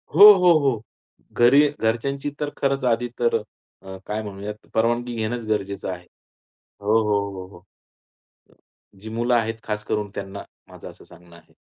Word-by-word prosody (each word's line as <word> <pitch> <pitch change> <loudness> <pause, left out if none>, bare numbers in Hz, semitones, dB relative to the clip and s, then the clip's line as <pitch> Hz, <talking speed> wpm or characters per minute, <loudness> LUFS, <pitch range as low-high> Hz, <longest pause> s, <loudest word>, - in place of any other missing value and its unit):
हो, 205 +4 +11
हो, 180 -2 +4
हो. 135 -7 0 0.6
घरी 135 +5 +6
घरच्यांची 135 +6 -1
तर 150 -1 -2
खरंच 135 -1 0
आधी 120 +2 0
तर 120 -1 +2 0.5
अ, 95 0 -9
काय 105 +1 -3
म्हणूयात 105 +1 -8
परवानगी 120 +2 0
घेणंच 115 +1 -3
गरजेचं 100 -3 -2
आहे. 90 -1 -8 0.8
हो, 105 +2 +2
हो, 105 -1 +2 0.2
हो, 95 -1 -8
हो. 85 - -18 1.3
जी 105 +3 -10
मुलं 120 +2 -1
आहेत 115 -1 0
खास 105 -1 -3
करून 105 -1 -2
त्यांना, 95 +1 -6 0.3
माझं - - -11
असं - - -16
सांगणं 90 -1 -17
आहे. 85 -1 -20
110 Hz, 155 wpm, -23 LUFS, 100-120 Hz, 1.3 s, हो